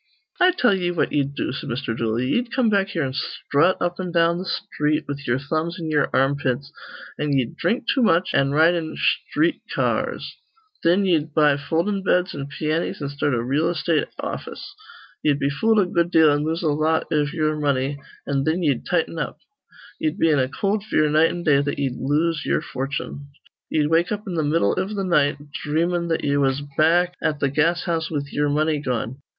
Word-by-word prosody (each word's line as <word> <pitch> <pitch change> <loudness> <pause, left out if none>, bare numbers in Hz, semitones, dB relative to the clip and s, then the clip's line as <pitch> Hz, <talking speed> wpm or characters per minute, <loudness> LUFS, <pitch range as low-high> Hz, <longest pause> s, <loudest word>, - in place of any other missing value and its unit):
"I 365 0 +6
tell 250 - +3
ye 180 -2 0
what 175 -2 0
ye'd 140 -1 -1
do," - - -2
said 135 - -6
Mr. 120 -1 -3
Dooley. 115 +2 -1
"Ye'd 240 -1 0
come 245 -3 +2
back 200 -1 +2
here 175 -6 -2
an' 130 -1 -3
sthrut 145 +4 +1
up 175 +1 -2
an' 180 -1 -3
down 170 0 +3
th' - - -9
sthreet 150 -2 -1
with 145 0 -6
ye'er 120 +1 +2
thumbs 160 +5 -2
in 160 -2 -4
ye'er 150 -1 +2
armpits; 135 0 0 0.5
an' 150 -1 0
ye'd 130 -4 0
dhrink 240 - 0
too 265 - +1
much, 185 -4 +2
an' 135 - +3
ride 160 +4 +4
in 165 -2 -3
sthreet - - 0
ca - - +2
ars. - - -6 0.4
Thin 180 +4 +3
ye'd 155 -4 0
buy 150 -2 +5
foldin' 170 +8 -1
beds 180 0 +1
an' 140 -1 -5
piannies, 155 +3 -2
an' 140 -2 -3
start 140 -1 -1
a 115 - -1
reel 145 +7 +1
estate 165 -2 0
office. 400 - -6 0.5
Ye'd 145 -2 +2
be 140 0 0
fooled 220 +9 +2
a 200 - +4
good 170 -1 0
deal 160 -3 +5
an' 145 +1 +1
lose 165 +2 -2
a 160 - +2
lot 155 +2 +1
iv 150 -1 +1
ye'er 155 -2 0
money, 140 -1 0 0.3
an' 140 -1 0
thin 160 +5 0
ye'd 140 -6 0
tighten 165 -1 0
up. - - -4 0.6
Ye'd 310 -1 -1
be 165 - +3
in 145 - +3
a 130 0 +1
cold 200 +5 -1
fear 155 -8 +2
night 155 +2 +4
an' 175 - -5
day 140 -4 +4
that 145 0 -2
ye'd 135 -3 -1
lose 150 +4 0
ye'er - - +1
fortune. 140 +1 -5 0.4
Ye'd 150 0 +1
wake 170 +2 +2
up 210 0 -3
in 190 - -5
th' 160 -3 0
middle 160 +3 +2
iv 190 +1 -2
th' 200 -2 -3
night, 150 -6 +2 0.3
dhreamin' 170 +3 0
that 165 -1 -1
ye 140 0 +1
was 135 0 +1
back 175 +3 +3
at 150 -1 0
th' 140 -2 0
gas 165 +4 +2
house 165 -2 -1
with 145 -2 -4
ye'er 145 0 +1
money 155 +1 +1
gone. 125 -1 -3
155 Hz, 210 wpm, -22 LUFS, 140-175 Hz, 0.6 s, I